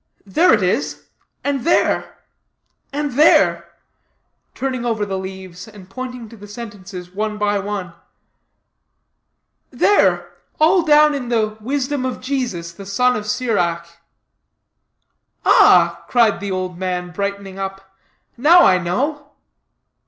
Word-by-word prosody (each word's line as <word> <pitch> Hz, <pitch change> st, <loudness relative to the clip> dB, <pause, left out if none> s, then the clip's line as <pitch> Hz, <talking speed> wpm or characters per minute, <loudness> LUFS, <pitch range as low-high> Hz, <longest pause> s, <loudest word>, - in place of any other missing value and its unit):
"There 260 Hz, -, +3 dB
it -, -, +3 dB
is; -, -, -2 dB, 0.3 s
and 280 Hz, -3 st, -1 dB
there 340 Hz, -, +1 dB, 0.7 s
and 290 Hz, 0 st, -2 dB
there" 295 Hz, +6 st, +3 dB, 0.8 s
turning 260 Hz, -2 st, -3 dB
over 225 Hz, -3 st, -1 dB
the 195 Hz, -1 st, -3 dB
leaves, 190 Hz, 0 st, -9 dB
and 200 Hz, -4 st, -15 dB
pointing 250 Hz, -1 st, -7 dB
to 230 Hz, -, -13 dB
the 205 Hz, -1 st, -12 dB
sentences 200 Hz, -5 st, -9 dB
one 210 Hz, +2 st, -3 dB
by 205 Hz, -1 st, 0 dB
one; 195 Hz, -3 st, -5 dB, 1.8 s
"there 410 Hz, -, +2 dB, 0.2 s
all 340 Hz, +4 st, +4 dB
down 300 Hz, -1 st, +5 dB
in 260 Hz, -4 st, -4 dB
the 215 Hz, -3 st, 0 dB
'Wisdom 270 Hz, +3 st, -2 dB
of 255 Hz, -1 st, -3 dB
Jesus, 245 Hz, -11 st, -3 dB
the 195 Hz, +3 st, -12 dB
Son 250 Hz, +5 st, +2 dB
of 210 Hz, 0 st, -5 dB
Sirach.'" 170 Hz, -7 st, -2 dB, 1.5 s
"Ah!" -, -, +5 dB
cried 230 Hz, -4 st, +3 dB
the 200 Hz, -, -5 dB
old 185 Hz, -1 st, -4 dB
man, 180 Hz, -1 st, -3 dB
brightening 200 Hz, 0 st, -5 dB
up, 195 Hz, 0 st, -7 dB, 0.4 s
"now 325 Hz, +8 st, +6 dB
I 185 Hz, -, +4 dB
know. 285 Hz, -, -3 dB
210 Hz, 125 wpm, -19 LUFS, 190-255 Hz, 1.8 s, now